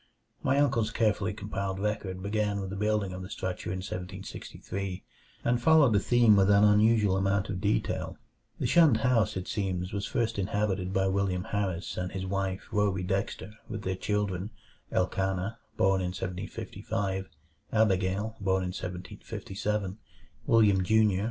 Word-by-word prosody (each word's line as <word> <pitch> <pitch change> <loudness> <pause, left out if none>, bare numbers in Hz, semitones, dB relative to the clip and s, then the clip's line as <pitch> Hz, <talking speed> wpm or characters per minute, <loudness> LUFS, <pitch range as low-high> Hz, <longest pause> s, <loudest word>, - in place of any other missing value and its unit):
My 135 +1 +2
uncle's 120 -6 +2
carefully 110 -2 +1
compiled 100 -2 -4
record 100 -3 -2
began 105 0 0
with 95 -1 -4
the - - -4
building 105 -2 0
of 90 - -6
the 95 - -7
structure 95 -2 -4
in 95 0 -3
1763, 95 0 -6 0.4
and 120 0 +2
followed 150 -3 +6
the 100 - +5
theme 120 0 +5
with 100 0 +4
an 100 0 +6
unusual 105 -1 +4
amount 100 +1 +1
of 90 -2 -3
detail. 105 +2 -1 0.4
The - - -1
shunned 160 -9 +5
house, 110 -5 +2
it 90 - -5
seems, 95 -4 -2
was 100 0 -2
first 115 -2 -1
inhabited 100 -2 -1
by 95 0 +1
William 95 -1 0
Harris 95 -4 -2
and 90 0 -2
his 95 -1 -4
wife 95 0 -2
Rhoby 100 -3 +1
Dexter, 95 +2 -2 0.2
with 110 -2 -5
their 95 - -1
children, 100 -1 -1 0.4
Elkanah, 95 +3 -1 0.2
born 95 0 +3
in 90 - -1
1755, 95 +2 -4 0.4
Abigail, 105 0 +1
born 95 -1 +1
in 90 - -2
1757, 95 +3 -4 0.5
William, 105 -5 +5
Jr. 105 -1 +3
100 Hz, 150 wpm, -29 LUFS, 95-105 Hz, 0.5 s, followed